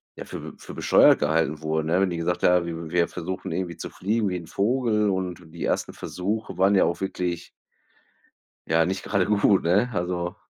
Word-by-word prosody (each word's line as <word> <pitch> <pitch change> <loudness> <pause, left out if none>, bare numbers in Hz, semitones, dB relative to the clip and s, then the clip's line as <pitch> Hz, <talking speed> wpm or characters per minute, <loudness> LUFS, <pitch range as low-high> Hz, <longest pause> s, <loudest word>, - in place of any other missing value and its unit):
ja, - - -8
für - - -8
für - - -10
bescheuert - - +5
gehalten 80 0 +1
wurde, 80 0 -1
ne? 90 +4 +2
Wenn 95 -2 +1
die 85 - -3
gesagt 85 +1 -2
haben: 90 -1 +4
„W 80 -1 -6
wir 85 -1 +3
versuchen 95 +2 -5
irgendwie, 85 0 -3
zu - - -6
fliegen 105 +2 -1
wie 90 - -2
'n 85 - -8
Vogel.“ 105 0 +1
Und 95 -2 -2
die 85 - -6
ersten - - -1
Versuche 100 +1 -4
waren 95 +2 +4
ja 95 - +5
auch 85 - -2
wirklich 90 -3 -3 1.2
ja, 80 +1 +3
nicht 95 +2 -2
gerade 100 -3 +1
gut, 105 -1 +3
ne, 100 +8 +2
also 90 -1 -2
90 Hz, 195 wpm, -25 LUFS, 85-100 Hz, 1.2 s, bescheuert